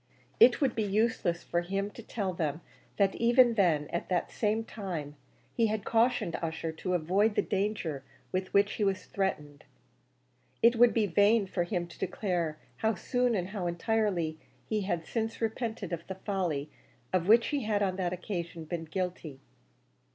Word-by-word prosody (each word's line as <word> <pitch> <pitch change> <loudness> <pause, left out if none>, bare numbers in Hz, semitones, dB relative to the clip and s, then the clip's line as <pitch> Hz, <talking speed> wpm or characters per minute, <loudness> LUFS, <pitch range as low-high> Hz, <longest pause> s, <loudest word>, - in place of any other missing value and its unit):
It 245 - +7
would 270 -4 +2
be 225 - -1
useless 205 -4 0
for 175 - 0
him 195 +3 -2
to 230 - -10
tell 200 -4 -3
them 160 -2 -2 0.4
that 195 -2 +3
even 240 +1 +5
then, 165 -8 +2
at 170 - -3
that 180 -2 0
same 220 +1 0
time, 175 -10 -5 0.4
he 230 -1 +2
had 215 -1 -2
cautioned 230 -6 +2
Ussher 165 0 -3
to 180 +3 -2
avoid 195 +6 +2
the - - +2
danger 190 -8 -2 0.3
with 185 0 -2
which 200 +1 +4
he 215 - -1
was 190 -2 0
threatened. 150 -7 -3 1.0
It 235 +1 +6
would 240 0 +6
be 220 -2 +2
vain 205 +3 +4
for 180 -2 -1
him 175 -2 -2
to 170 - -14
declare 175 -5 -1 0.2
how 220 -1 +1
soon 245 +5 0
and 185 -2 -2
how 190 -3 -3
entirely 175 -3 0 0.3
he 215 -1 0
had 175 -4 -2
since 225 -1 -3
repented 220 -4 -3
of 170 0 -5
the 190 - -5
folly 175 -7 -2 0.4
of 180 -1 +1
which 230 +2 +6
he 285 -6 -1
had 205 -1 +1
on 190 -1 -1
that 180 -2 -1
occasion 170 -3 -5
been 165 0 -4
guilty. 175 -4 -4
190 Hz, 175 wpm, -30 LUFS, 170-220 Hz, 1.0 s, It